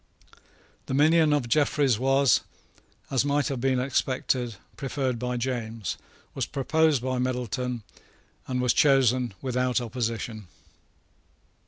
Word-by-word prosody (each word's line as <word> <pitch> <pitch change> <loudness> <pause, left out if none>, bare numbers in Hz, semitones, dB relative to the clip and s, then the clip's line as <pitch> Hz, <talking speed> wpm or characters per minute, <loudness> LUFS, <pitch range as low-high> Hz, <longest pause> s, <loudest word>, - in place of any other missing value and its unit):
The 130 - -2
minion 155 +2 +4
of 145 -5 +1
Jeffreys 140 -2 +2
was, 135 0 +3 0.7
as 135 -1 +2
might 145 0 +1
have 135 -4 -3
been 130 -1 +2
expected, 130 -2 -1 0.2
preferred 130 -3 -2
by 125 0 -2
James, 115 -4 -3 0.4
was - - -2
proposed 150 -1 +1
by 130 -1 -1
Middleton, 125 -1 -2 0.6
and 125 -1 -1
was 125 - +3
chosen 130 -5 +3
without 125 -1 0
opposition. 115 -3 -4
130 Hz, 115 wpm, -26 LUFS, 120-135 Hz, 0.7 s, minion